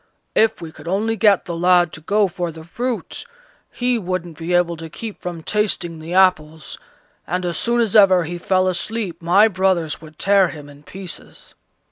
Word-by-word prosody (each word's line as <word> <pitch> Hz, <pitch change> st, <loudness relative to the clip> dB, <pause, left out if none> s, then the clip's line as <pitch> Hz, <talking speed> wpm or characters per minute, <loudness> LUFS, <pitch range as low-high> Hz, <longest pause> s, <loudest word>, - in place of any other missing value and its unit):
If 220 Hz, -5 st, +2 dB
we 160 Hz, -, -7 dB
could 155 Hz, +1 st, -14 dB
only 210 Hz, +5 st, 0 dB
get 210 Hz, -4 st, +3 dB
the 170 Hz, -, -4 dB
lad 175 Hz, -1 st, +3 dB
to 160 Hz, -, -9 dB
go 205 Hz, +5 st, +2 dB
for 175 Hz, -1 st, -4 dB
the 160 Hz, 0 st, -11 dB
fruit, 240 Hz, +8 st, -4 dB, 0.5 s
he 245 Hz, -1 st, 0 dB
wouldn't 180 Hz, -3 st, -4 dB
be 165 Hz, +3 st, -5 dB
able 175 Hz, -1 st, +2 dB
to 165 Hz, 0 st, -8 dB
keep 215 Hz, +6 st, -8 dB
from 175 Hz, -2 st, -6 dB
tasting 190 Hz, -6 st, -1 dB
the 165 Hz, +3 st, -6 dB
apples, 160 Hz, -5 st, +1 dB, 0.5 s
and 180 Hz, +2 st, -2 dB
as 175 Hz, -1 st, -2 dB
soon 240 Hz, 0 st, 0 dB
as 225 Hz, -4 st, +1 dB
ever 190 Hz, -4 st, +6 dB
he 175 Hz, +2 st, -5 dB
fell 185 Hz, +1 st, +1 dB
asleep 185 Hz, 0 st, -3 dB
my 185 Hz, +6 st, +5 dB
brothers 185 Hz, -6 st, 0 dB
would 155 Hz, -1 st, -14 dB
tear 195 Hz, -1 st, +4 dB
him 150 Hz, -3 st, -10 dB
in 145 Hz, 0 st, -15 dB
pieces." 185 Hz, +3 st, -9 dB
180 Hz, 185 wpm, -20 LUFS, 165-200 Hz, 0.5 s, ever